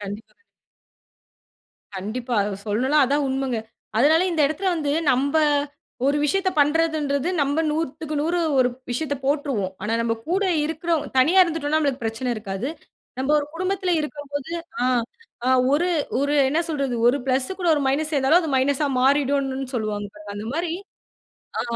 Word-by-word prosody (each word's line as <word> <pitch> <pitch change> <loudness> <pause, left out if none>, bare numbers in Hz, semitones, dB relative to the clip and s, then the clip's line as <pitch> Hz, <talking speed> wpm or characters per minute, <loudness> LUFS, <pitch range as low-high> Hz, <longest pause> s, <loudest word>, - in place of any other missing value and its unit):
கண்டிப்பா, 205 +2 -8
கண்டிப் 460 - -38 1.5
கண்டிப்பா. 235 +6 -4
அத 200 -1 -3
சொல்லலாம், 260 +8 +3
அததான் 285 +3 +1
உண்மைங்க. 265 -3 -1 0.4
அதனால 310 +7 +5
இந்த 325 - 0
இடத்தில 315 +7 -1
வந்து, 295 -3 -1 0.2
நம்ப 280 +4 +1 0.7
ஒரு 285 - +2
விஷயத்த 375 +6 +1
பண்றதுன்றது 300 -1 +1
நம்ப 285 +2 +1
100க்கு 310 0 -3
100 335 +4 0 0.2
ஒரு 250 -1 +4 0.2
விஷயத்த 285 +4 -1
போட்டுருவோம். 275 -10 0
ஆனா 215 +2 -2
நம்ப 230 0 0
கூட 385 +3 +1 0.2
இருக்கிறவ் 320 0 -1
தனியா 325 +9 +5
இருந்துட்டோன்னா 315 -2 0
நம்மளுக்கு 280 -4 -1
பிரச்சனை 225 +3 -2
இருக்காது. 205 +2 -4 0.5
நம்ப 265 +2 -1
ஒரு 290 - -2
குடும்பத்தில 370 +1 -1
இருக்கும்போது, 290 0 -5 0.3
ஆ, - - +2 0.6
ஆ - - +3 0.2
ஒரு 335 +5 +2 0.3
ஒரு 285 +1 +1
என்ன 305 +5 +1
சொல்றது? 280 -5 -1
ஒரு 250 - +3
பிளஸ்ஸு 265 +7 0
கூட 355 - +1
ஒரு 295 - 0
மைனஸ் 300 +4 0
சேர்ந்தாலும் 285 +4 +4
அது 320 - -3
மைனஸா 280 +3 +2
மாறிடும்னுன்னு 270 0 +1
சொல்லுவாங்க 210 -3 -2
பாருங்க. 210 -1 -9
அந்தமாரி, 280 +12 -3 0.9
ஆ, - - 0
285 Hz, 145 wpm, -23 LUFS, 255-315 Hz, 1.5 s, அதனால